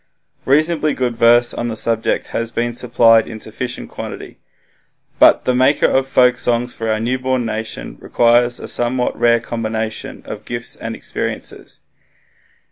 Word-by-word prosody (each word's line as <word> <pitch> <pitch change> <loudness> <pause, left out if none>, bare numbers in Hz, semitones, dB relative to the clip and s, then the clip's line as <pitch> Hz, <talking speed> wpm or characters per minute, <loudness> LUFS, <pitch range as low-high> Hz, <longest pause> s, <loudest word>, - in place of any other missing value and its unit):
Reasonably 155 +2 +2
good 125 -2 -2
verse 120 +1 +4
on 120 - -3
the 115 - -4
subject 115 0 0
has 115 0 -2
been 120 +1 -2
supplied 115 -2 +4
in 110 - -8
sufficient 120 +3 -6
quantity. - - -8 0.8
But - - +5
the 125 - +2
maker 130 +3 +3
of 135 0 +2
folksongs 125 -2 +2
for 115 0 -4
our 110 - 0
newborn 130 +1 -1
nation 110 0 -5
requires 120 +1 +2
a - - -8
somewhat 125 +1 0
rare 115 0 +3
combination 110 -1 -5
of - - -8
gifts 120 -1 -5
and - - -6
experiences. - - -6
120 Hz, 140 wpm, -18 LUFS, 115-125 Hz, 0.8 s, But